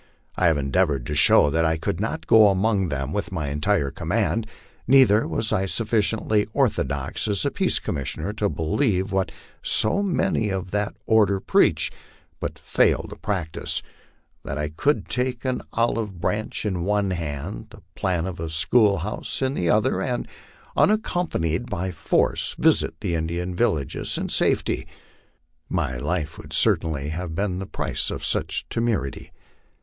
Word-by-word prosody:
I 90 - +3
have 80 -3 +3
endea 70 +7 +2
vored 70 -5 -3
to 75 - -3
show 75 - +6
that 80 +2 +2
I 80 0 +2
could 80 +2 -2
not 110 +3 -3
go 110 -2 +7
among 100 -1 +2
them 70 0 -3
with 105 +1 -3
my 80 -6 -2
entire 75 0 0
command, 110 +9 -1 0.4
neither 125 -6 +5
was 110 -1 -2
I 95 +1 +1
sufficiently 110 +2 +1
orthodox 75 - 0
as 100 -5 0
a - - +1
peace - - +1
commissioner 80 +7 -3
to 105 -1 0
believe 90 +5 0
what 95 -1 0 0.3
so 195 - +1
many 175 - 0
of 95 -2 -3
that 105 0 -1
order 105 -3 +3
preach, - - +2 0.5
but - - -4
fail - - +2
to - - -7
practise, 95 -7 -3 0.6
that 70 - -4
I 75 0 -2
could 110 - 0
take 125 0 -2
an 130 -1 -1
olive 115 -5 -1
branch 110 +5 -2
in 95 -5 -1
one 100 0 +1
hand, 80 +1 -4
the - - -15
plan 90 -3 -1
of 95 -3 -5
a 80 0 -3
school 100 +7 +3
house 105 - -4
in 130 0 0
the 85 -10 -1
other, 110 +7 +2
and, 125 -2 -2 0.5
unaccompa 190 -5 +1
nied 85 +9 -1
by 95 -3 -2
force, 75 -3 0
visit - - +3
the 90 -4 -1
Indian 85 +2 -2
villages 80 - -1
in - - -3
safety. - - 0 0.8
My 65 - -1
life 75 +4 -2
would - - -9
certainly 75 -3 +2
have 80 +1 -4
been 95 -1 -1
the 95 - -5
price - - -2
of - - -4
such - - -1
temerity. 115 - -2
95 Hz, 160 wpm, -24 LUFS, 80-110 Hz, 0.8 s, go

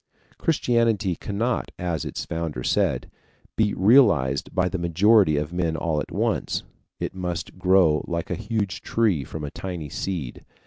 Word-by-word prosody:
Christianity 115 - +1
cannot, 115 +7 -2
as 85 -5 -2
its - - -4
Founder 80 -6 -4
said, - - 0 0.4
be 105 -2 +1
realized 95 - +4
by 90 -1 +1
the 90 0 -3
majority 85 0 +4
of 75 +3 -3
men 85 -2 0
all 80 -2 0
at - - -7
once; - - -1 0.4
it - - -3
must 90 -1 -5
grow 90 -5 +4
like 85 -1 -3
a - - +2
huge 105 -2 -3
tree 105 -11 +1
from 75 +3 -7
a 70 - -4
tiny 90 -6 -6
seed. 80 -7 -4
90 Hz, 150 wpm, -24 LUFS, 80-105 Hz, 0.4 s, realized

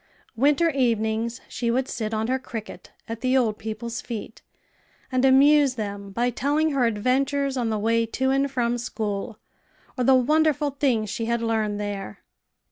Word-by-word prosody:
Winter 295 +7 +3
evenings 230 -3 0
she 235 - -3
would 255 +2 +1
sit 220 -2 -3
on 220 0 -1
her 260 +3 0
cricket 225 -5 -8 0.2
at 230 0 -6
the 255 +1 +2
old 220 -5 +1
people's 220 +2 -5
feet, 225 -2 -7 0.7
and 255 0 +1
amuse 275 +1 +5
them 200 -3 -5
by 240 +5 0
telling 295 +6 +1
her 270 -3 +2
adventures 270 +5 0
on 240 -3 -1
the 215 - 0
way 230 +2 +1
to 265 +3 0
and 275 +1 +1
from 245 -2 -1
school, 215 -1 -4 0.6
or 250 - -1
the 265 +2 +5
wonderful 300 +2 +2
things 250 -7 0
she 225 +2 -3
had 235 0 -1
learned 215 -2 0
there. 200 - -5
235 Hz, 165 wpm, -24 LUFS, 220-270 Hz, 0.7 s, amuse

